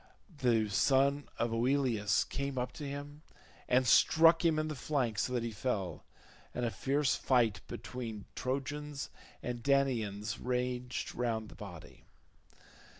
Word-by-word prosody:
The 115 -4 +3
son 140 +6 +2
of 115 0 0
Oileus 120 -4 +2
came 140 -1 -4
up 125 0 -1
to 150 - -8
him 145 +1 -7 0.5
and 130 +1 +4
struck 165 +7 +6
him 165 -2 +3
in 155 0 0
the 155 - -3
flank 125 -6 -1
so - - 0
that 120 -2 0
he 115 - -2
fell, 105 -5 -3 0.5
and 125 - 0
a 115 - 0
fierce 140 +3 +1
fight 120 -5 +2
between 115 -5 -6
Trojans 140 +2 -3 0.3
and 120 -1 -3
Danaans 115 -7 +1
raged 125 0 -2
round 115 -3 -2
his - - -13
body. 90 -6 -10
125 Hz, 140 wpm, -33 LUFS, 115-140 Hz, 0.5 s, struck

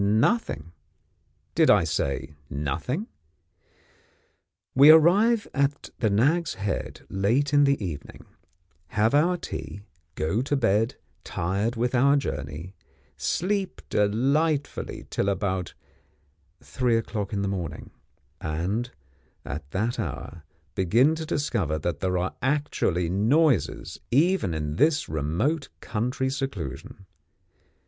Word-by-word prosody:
Nothing! 105 - +1 0.8
Did - - +4
I - - +6
say 70 +2 -2 0.2
Nothing? 85 - -2 1.7
We 140 +3 +8
arrive 200 +8 +6
at 140 +1 0
the 110 - +2
Nag's 145 +11 +2
Head 100 -1 -3
late 120 +10 +1
in 145 0 +6
the 140 0 +3
evening, 75 -5 -7 0.6
have 110 - +1
our 170 +5 +3
tea, 100 - -6 0.3
go 80 +9 0
to 145 +2 0
bed 115 0 +2 0.3
tired 100 +7 -1
with 120 +2 0
our 140 +3 +5
journey, 80 - -4 0.4
sleep 195 +1 -1
delightfully 140 +9 0
till 100 - 0
about 95 -2 -2 0.9
three 125 -3 +1
o'clock 105 -3 -3
in 100 -2 -1
the - - 0
morning, 90 -5 -4 0.5
and, 90 +10 -2 0.6
at 70 0 -6
that 110 +10 -1
hour, 85 - -5 0.3
begin 115 - +3
to 160 0 -5
discover 105 - -1
that 85 +3 -3
there 90 -1 0
are 90 +1 -1
actually 130 - 0
noises, 115 - +1
even 145 - +2
in 75 0 -3
this 150 - +3
remote 85 - -1
country 125 +4 -2
seclusion. 100 - -5
115 Hz, 110 wpm, -26 LUFS, 90-145 Hz, 1.7 s, We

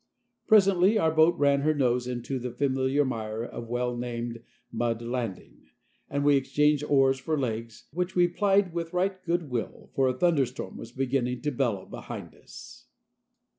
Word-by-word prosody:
Presently 195 -1 +5
our 160 -6 +2
boat 160 +2 +4
ran 140 -1 +3
her 155 +2 +2
nose 125 -3 +1
into 125 +2 -3
the 125 +1 -4
familiar 135 +2 +1
mire 110 -3 -3
of 120 -1 -7
well 125 0 -1
named 120 -1 -4 0.3
Mud 115 0 -1
Landing, 115 -5 -5 0.4
and 140 0 -1
we 145 -1 +5
exchanged 150 +2 +2
oars 135 -2 +3
for 155 +4 -1
legs, 115 -4 -4
which 180 +2 -2
we 175 -1 +5
plied 195 0 +2
with 170 0 -4
right 185 +1 -1
good 170 -4 -1
will, 120 -3 -4
for 135 -1 +2
a 130 0 -1
thunderstorm 140 -6 0
was 115 - -9
beginning 125 -1 -1
to 150 - 0
bellow 120 -8 -1
behind - - -8
us. - - -13
135 Hz, 165 wpm, -27 LUFS, 120-160 Hz, 0.4 s, Presently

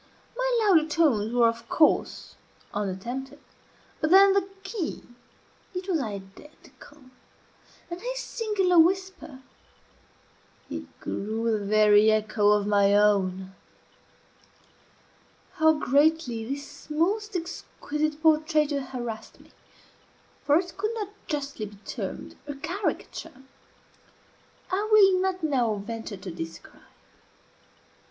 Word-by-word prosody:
My - - +1
louder 325 -6 +4
tones 265 -10 +2
were, 240 -1 +4
of 230 0 -4
course, 310 - +1 0.4
unattempted, 235 +8 -4 0.6
but 310 - 0
then 390 +2 +7
the 390 -1 0
key, 375 -3 -4 0.7
it 365 +1 -4
was 350 -5 +1
identical; 210 +7 -10 0.9
and 345 +1 -7
his - - -4
singular 405 -8 +1
whisper, 355 -5 0 1.3
it - - -8
grew 225 +3 -2
the 210 - -3
very 210 +1 +5
echo 215 -1 +2
of 210 -1 +3
my 200 -1 +3
own. 190 -2 +2 2.0
How 315 0 +5
greatly 285 -5 +1
this 280 +3 -8
most 395 +7 0
exquisite 310 -3 -4
portraiture 305 -2 +2
harassed 240 -4 -7
me - - -20 0.9
(for 290 +1 +4
it 355 0 -3
could 425 +3 -2
not 420 -3 -4 0.2
justly 280 -7 -4
be 205 - -14
termed - - -6
a 290 - -5
caricature) 330 -3 -5 1.3
I 410 +3 -1
will 390 -3 +6
not 375 -2 -1
now 250 -8 +1
venture 220 0 -6
to 185 -1 -8
describe. 165 0 -9
295 Hz, 105 wpm, -26 LUFS, 215-360 Hz, 2.0 s, then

